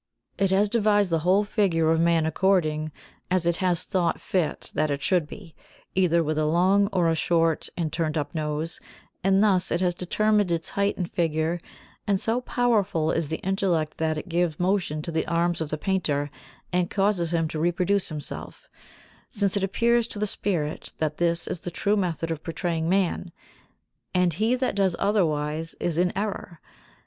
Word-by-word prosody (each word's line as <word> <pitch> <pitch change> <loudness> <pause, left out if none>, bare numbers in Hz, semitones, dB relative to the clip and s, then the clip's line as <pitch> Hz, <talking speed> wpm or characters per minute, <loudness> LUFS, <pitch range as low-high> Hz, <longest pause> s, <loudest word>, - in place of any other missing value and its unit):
It 195 -1 +3
has 195 +2 +3
devised 205 -3 +2
the 165 - +2
whole 185 +5 +3
figure 175 -7 +1
of 165 - +2
man 165 -1 +3
according 160 -3 +1 0.4
as 185 -2 +1
it 170 -1 +1
has 180 -2 0
thought 175 -3 0
fit 175 -5 -2
that 155 0 +1
it 140 0 -2
should 180 -6 +2
be, 170 -1 -11 0.4
either 170 -3 +3
with 155 0 -1
long 185 +6 +3
or 180 -3 +2
a 165 - +3
short 165 0 +1
and 160 -3 -2
turned 160 -2 -1
up 145 - -3
nose, 155 +1 -3 0.4
and 195 +2 +4
thus 190 -3 +2
it 170 - +1
has 180 -1 +1
determined 205 +3 +1
its 165 -1 -1
height 200 0 0
and 180 - -2
figure; 165 0 0 0.5
and 200 -2 +2
so 230 +5 0
powerful 205 -11 +1
is 165 -3 -1
the 160 - -2
intellect 185 -5 0
that 160 -1 0
it 155 - -6
gives 170 -2 0
motion 180 -5 0
to 170 - -5
the 160 0 -1
arms 170 0 0
of 155 - -2
the 155 - -2
painter 150 -5 -1 0.4
and 180 -1 +1
causes 195 -4 +1
him 165 -2 +1
to 155 - -4
reproduce 180 +4 +1
himself, 150 -2 -7 0.6
since 200 -4 0
it 200 - 0
appears 235 +4 +2
to 215 - -6
the 210 - 0
spirit 170 -7 -2
that 155 -1 -2
this 170 0 +1
is 170 - -4
the - - -4
true 200 +4 0
method 170 -4 -1
of 160 -2 -3
portraying 165 -1 -2
man, 185 -2 0 0.8
and 180 -2 +3
he 220 +9 +1
that 255 0 -1
does 190 -3 +1
otherwise 160 -5 0
is 170 -1 -1
in 180 0 +2
error. 195 -5 -4
175 Hz, 180 wpm, -25 LUFS, 160-195 Hz, 0.8 s, and